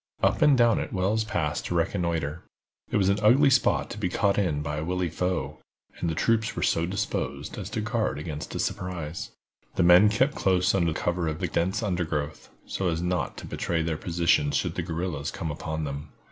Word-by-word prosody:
Up - - +3
and 145 -3 +6
down 120 -2 +4
it - - -4
Wells 100 +3 +1
passed 85 -9 -2
to 85 - -2
reconnoiter. 85 -3 -1 0.5
It - - +1
was 95 -2 +3
an 100 +1 +2
ugly 135 +7 +5
spot 125 -2 +2
to 105 - -6
be 95 -4 0
caught 100 +2 +1
in 75 -7 0
by 75 +1 -3
a 75 - -2
wily 90 +1 -1
foe, 90 +2 -2 0.4
and 85 - -1
the 80 - -2
troops 110 +4 +1
were - - -2
so 85 +1 +2
disposed 95 +2 -3
as - - -6
to - - -2
guard 110 -6 -1
against 75 0 -6
a - - -2
surprise. 85 -4 -3 0.5
The 90 - +3
men 90 +4 +7
kept 130 +7 +2
close 90 -6 +2
under 85 -4 +2
cover 85 +1 -1
of 80 0 -3
the - - -1
dense 95 +6 0
undergrowth, 80 -6 -2 0.2
so 95 - -2
as 80 -1 -1
not 90 0 -1
to - - -7
betray 85 -1 -1
their 80 0 -1
position 85 -3 +2
should - - 0
the - - -2
guerrillas 80 -3 -3
come 80 - -4
upon 80 +1 -4
them. 70 +1 -5
90 Hz, 205 wpm, -27 LUFS, 80-100 Hz, 0.5 s, men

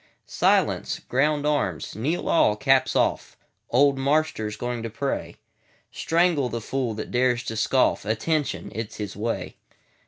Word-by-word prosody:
Silence! - - +1
Ground 145 +3 +1
arms! 120 - -1
Kneel 145 - -2
all! 105 -10 +4
Caps 135 +4 +2
off! - - 0 0.3
Old 135 +2 +3
Marster's 140 -7 0
going 120 +1 -3
to 115 - -4
pray. 135 +5 -3 0.6
Strangle 165 -6 +1
the 115 +1 -3
fool 120 0 -2
that 110 - -6
dares 125 -1 +2
to 115 - -5
scoff:Attention!—it 115 0 0
's - - -11
his 105 -2 -5
way. 115 +3 -3
125 Hz, 130 wpm, -24 LUFS, 110-145 Hz, 0.6 s, all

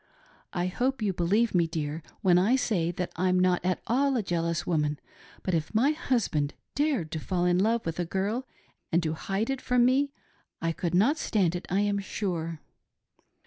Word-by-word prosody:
I 175 -1 -1
hope 245 +6 -1
you 200 -2 +1
believe 200 +6 +2
me, 170 -2 +3
dear, 155 0 -3 0.2
when 180 -4 +5
I 210 +8 +4
say 195 -10 +1
that 175 0 -3
I'm 185 +1 +2
not 180 -1 +2
at 185 0 -1
all 270 +2 +2
a 225 - 0
jealous 170 -2 -1
woman, 150 -3 0 0.5
but 185 - -1
if 165 +5 -1
my 260 +7 +4
husband 230 - 0 0.2
dared 275 - 0
to 160 - -2
fall 175 +2 -1
in 180 0 +3
love 225 +3 +2
with 165 0 -3
a 175 - 0
girl 205 +9 -2 0.4
and 170 +1 +2
to 155 -1 0
hide 195 +9 -2
it 270 -1 -3
from 250 -1 +3
me, 275 +3 +3 0.5
I 165 - 0
could 175 +1 -2
not 260 - +3
stand 180 -5 +1
it 175 - -5
I 195 +3 +2
am 205 -1 +1
sure. 170 -5 -3
185 Hz, 190 wpm, -28 LUFS, 170-230 Hz, 0.5 s, when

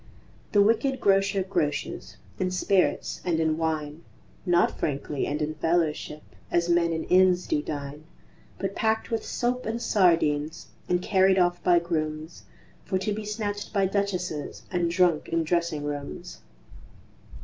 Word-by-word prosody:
The 205 -1 +5
wicked 245 +5 +2
Grocer 195 0 +2
groces 150 - -2 0.2
In 185 - 0
spirits 185 +1 0
and 170 -3 0
in 160 -1 +1
wine, 155 -1 -2 0.4
Not 175 0 +2
frankly 145 -1 -2
and 150 +1 -1
in 155 +1 -2
fellowship 155 -1 -1 0.3
As 170 0 +1
men 170 -1 +3
in 160 -1 -2
inns 185 -1 +4
do 315 -2 0
dine; 145 - -6 0.5
But 195 0 -3
packed 220 0 0
with 225 - -1
soap 245 0 -2
and 225 +1 -2
sardines 165 -7 +1 0.2
And 180 0 +1
carried 190 -1 +3
off 175 -1 +2
by 175 -1 +5
grooms, 155 -1 -3 0.4
For 190 - -1
to 195 +3 -1
be 215 +1 -5
snatched 205 -1 -4
by 200 -2 +2
Duchesses 185 -6 -2
And 175 -2 +1
drunk 175 -2 +2
in 165 0 +1
dressing 170 -2 -1
rooms. 140 - -6
175 Hz, 145 wpm, -26 LUFS, 155-195 Hz, 0.5 s, The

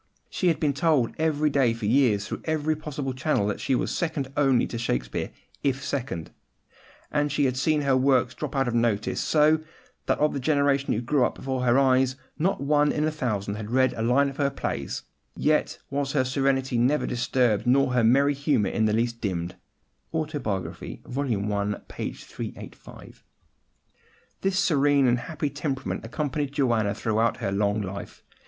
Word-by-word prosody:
She 185 - 0
had 165 - +2
been 145 -3 +1
told 145 -5 +2
every 155 -1 +1
day 135 -5 +3
for 115 -2 -5
years, 110 -3 +3
through - - -5
every 155 -1 0
possible 145 -3 -4
channel, 130 -5 0
that 105 - -2
she 130 - 0
was - - -1
second 150 -5 -2
only 135 -4 +3
to 115 - -5
Shakespeare, 60 - -2 0.3
if 135 -1 0
second; 115 - -3 0.8
and 145 -1 +2
then - - -2
she 145 0 +1
had 130 -1 +1
seen 150 +3 +1
her 135 -1 +3
works 130 -2 +3
drop 150 -2 -5
out 135 -2 +1
of 120 - -1
notice, 115 -3 0
so 155 0 +4 0.5
that, - - +2
of 150 +1 +2
the 140 - -2
generation 140 0 +2
who 110 - -1
grew 130 +2 +2
up - - 0
before 130 -1 -3
her 120 +1 +4
eyes, 130 -1 +3 0.2
not 185 +5 +1
one 145 +1 +2
in 150 - -1
a 155 - +1
thousand 105 -8 -2
had 105 0 -6
read 130 +1 +3
a - - -5
line 125 +5 +3
of 135 0 -6
her 140 -2 +2
plays; 70 - -4 0.3
yet - - +1
was 140 0 -1
her 135 -3 +3
serenity 135 -1 +1
never 135 +5 +2
disturbed, 120 -2 +1
nor 130 0 +3
her 125 -2 +3
merry 140 +5 +4
humour 140 -7 +1
in 110 - +1
the 105 - +2
least 115 +1 -1
dimmed" 90 -4 -3 0.6
(Autobiography, 145 - -3
vol. 140 +3 -3 0.3
i. 100 0 0
p. - - -4
385). - - -10 1.2
This 195 -1 0
serene 145 -6 +3
and 120 -1 +3
happy 150 0 -3
temperament 135 - -3
accompanied 145 +2 -3
Joanna 120 -8 +1
throughout 110 +1 0
her 95 - -2
long 100 +1 0
life. 95 +1 -7
135 Hz, 180 wpm, -26 LUFS, 115-145 Hz, 1.2 s, so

